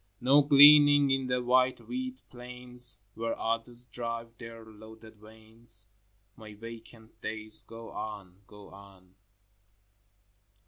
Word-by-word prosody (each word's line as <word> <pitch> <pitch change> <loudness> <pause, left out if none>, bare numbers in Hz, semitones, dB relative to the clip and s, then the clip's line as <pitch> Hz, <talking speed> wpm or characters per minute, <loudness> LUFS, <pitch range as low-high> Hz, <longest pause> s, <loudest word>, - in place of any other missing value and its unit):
No 135 +4 +4
gleaning 145 0 +7
in 135 -1 -1
the 125 -1 -2
wide 130 +1 +2
wheat 255 0 -7
plains 125 -1 -1 0.2
Where 115 +1 -4
others 115 +2 -4
drive 115 0 -7
their 115 -1 -11
loaded 110 0 -16
wains? 110 +2 -7 0.5
My 110 -1 -13
vacant 115 0 -13
days 110 0 -6
go 115 0 -12
on, 100 -3 -9
go 105 -1 -15
on. 95 -2 -17
115 Hz, 110 wpm, -28 LUFS, 110-125 Hz, 0.5 s, gleaning